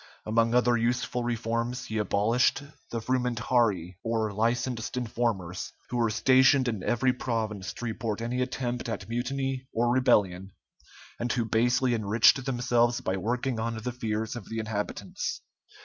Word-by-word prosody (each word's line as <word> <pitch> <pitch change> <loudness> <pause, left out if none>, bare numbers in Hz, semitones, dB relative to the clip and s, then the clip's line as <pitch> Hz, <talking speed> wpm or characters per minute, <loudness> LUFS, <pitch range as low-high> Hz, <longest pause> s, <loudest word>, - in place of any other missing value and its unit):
Among 115 +2 +2
other 125 -1 +4
useful 120 +1 0
reforms, 120 +1 -2
he 110 0 -3
abolished 115 +6 +2 0.3
the 115 - -3
frumentarii, 120 -7 0
or 110 -2 -1
licensed 120 +3 -1
informers, 110 -7 -2 0.2
who 125 - -1
were 115 -1 +2
stationed 130 +4 +4
in 110 -5 -2
every 125 +4 +2
province 110 -6 -3
to 120 - -7
report 110 -2 -3
any 120 +2 -2
attempt 125 -2 -2
at 110 - -4
mutiny 130 +2 -2
or 120 +1 +1
rebellion, 95 -7 +2 0.7
and 120 0 -1
who 115 -1 0
basely 120 +3 +2
enriched 110 +4 +4
themselves 120 -2 +1
by 95 - -2
working 120 +4 -1
on 115 0 -2
the 120 +3 -3
fears 110 -1 -3
of 120 -5 -8
the 115 - -4
inhabitants. 110 -2 -3
115 Hz, 145 wpm, -28 LUFS, 110-125 Hz, 0.7 s, other